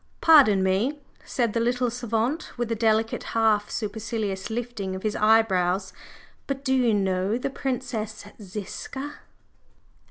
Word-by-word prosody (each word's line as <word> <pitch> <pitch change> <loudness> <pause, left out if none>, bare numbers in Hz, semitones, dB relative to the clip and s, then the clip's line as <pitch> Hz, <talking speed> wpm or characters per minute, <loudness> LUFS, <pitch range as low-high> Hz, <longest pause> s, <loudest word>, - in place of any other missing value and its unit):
"Pardon 260 - +6
me!" 200 +10 +1 0.3
said 235 -4 -1
the 230 - +1
little 245 +1 +1
savant, 240 +5 -2
with 240 -1 -2
a - - +1
delicate, 225 0 +1 0.2
half 215 -2 +3
supercilious 210 -2 -3
lifting 225 -5 -4
of 190 - -7
his 215 -1 -1
eyebrows. 195 -4 +2 0.5
"But 275 0 -4
do 265 - +2
you 250 -3 +3
know 190 +2 0
the 250 - -3
Princess 225 -6 -4 0.2
Ziska?" 215 +9 -6
225 Hz, 130 wpm, -25 LUFS, 205-245 Hz, 0.5 s, Pardon